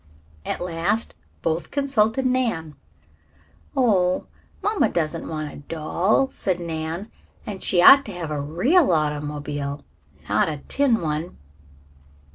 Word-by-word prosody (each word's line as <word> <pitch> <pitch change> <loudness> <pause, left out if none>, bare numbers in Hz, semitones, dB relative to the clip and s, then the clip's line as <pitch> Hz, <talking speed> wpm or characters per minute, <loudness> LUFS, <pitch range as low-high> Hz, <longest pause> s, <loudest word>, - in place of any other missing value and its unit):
At - - -2
last 180 +6 -1 0.3
both 160 +1 -1
consulted 265 -3 +1
Nan. 230 -12 0 1.0
"Oh, 185 -8 +2 0.4
mamma 420 0 +2
doesn't 165 -1 -2
want 155 -2 -4
a - - -10
doll," 170 - 0
said 185 -8 -1
Nan. 165 +4 -4 0.3
"And 195 -3 -6
she 175 -2 +3
ought 275 +6 +9
to 205 - -7
have 170 -3 -5
a 150 -1 -2
real 230 - +3
automobile, 150 -2 -2 0.4
not 105 +9 +2
a 150 - -3
tin 265 -7 +2
one." 155 +2 -3
170 Hz, 120 wpm, -23 LUFS, 155-225 Hz, 1.0 s, ought